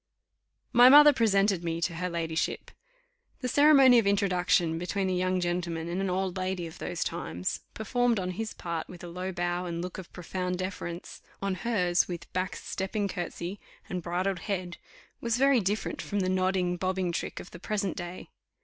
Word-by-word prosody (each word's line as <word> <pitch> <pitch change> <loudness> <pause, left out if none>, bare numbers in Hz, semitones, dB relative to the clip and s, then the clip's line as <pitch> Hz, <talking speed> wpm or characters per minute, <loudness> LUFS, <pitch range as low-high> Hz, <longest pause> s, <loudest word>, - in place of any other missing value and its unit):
My 245 +1 +9
mother 295 +2 +9
presented 200 -5 +2
me 165 -1 -2
to 170 +1 0
her 180 +1 -2
ladyship. 165 -1 -2 0.7
The 250 - -1
ceremony 275 -2 +7
of 215 - 0
introduction 180 -4 +2
between 190 +2 -1
a - - 0
young 185 0 +1
gentleman 175 -2 -2
and 175 +3 -2
an 195 - -1
old 185 0 -1
lady 185 -1 -2
of 160 - -10
those 175 -2 -2
times, 85 +3 -3 0.2
performed 235 +1 +1
on 185 -1 -2
his 220 +4 -5
part 170 -2 -4
with 180 -1 -11
a - - -6
low 180 +2 -4
bow 175 0 -2
and 170 -1 -3
look 180 +2 -5
of 185 - -10
profound 180 +1 -3
deference, 185 -2 -5 0.2
on 195 -1 -1
hers, 185 -4 +1
with 175 -2 -7
back 185 +1 -1
stepping 200 +2 -3
curtsy 180 +1 -5 0.3
and 180 -1 -3
bridled 180 +2 -1
head, 180 -2 -3 0.4
was 235 0 0
very 275 -1 +5
different 205 +1 -2
from 205 -1 -2
the 185 - 0
nodding, 185 -1 +1
bobbing 185 -1 -1
trick - - -4
of - - -10
the 170 - -10
present 200 -2 -2
day. 175 +1 -7
185 Hz, 180 wpm, -29 LUFS, 175-200 Hz, 0.7 s, My